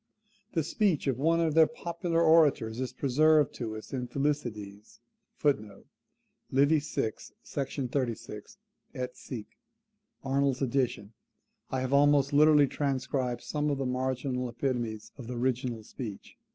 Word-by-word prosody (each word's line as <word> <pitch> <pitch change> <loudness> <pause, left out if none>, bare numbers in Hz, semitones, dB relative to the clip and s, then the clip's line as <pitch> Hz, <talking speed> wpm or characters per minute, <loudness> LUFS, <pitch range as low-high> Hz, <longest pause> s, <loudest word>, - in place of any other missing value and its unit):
The 165 - +1
speech 190 -1 +1
of 130 -3 0
one 165 +3 +3
of 165 -2 +1
their 160 0 +6
popular 170 -5 -1
orators 150 -9 +4
is 130 -1 -2
preserved 150 +2 +3
to 110 -3 -4
us 110 - -10
in 125 -2 -2
Thucydides, 115 -8 -3 0.4
[Lib. 145 -5 +4 0.9
vi. 145 +4 +4
sec. 115 -6 -3 0.3
36 125 -5 -4 0.4
et 125 0 -4
seq., 115 -5 -7 0.8
Arnold's 135 0 +1
edition. 125 -5 -1 0.6
I 130 - -1
have 130 +1 -2
almost 145 0 +4
literally 150 0 +6
transcribed 130 -3 -2
some 150 0 -1
of 140 - 0
the 135 - -2
marginal 125 0 -1
epitomes 120 -3 -3
of 120 - -8
the 125 0 -5
original 125 -2 -1
speech. 105 -2 -8
135 Hz, 130 wpm, -29 LUFS, 120-145 Hz, 0.9 s, their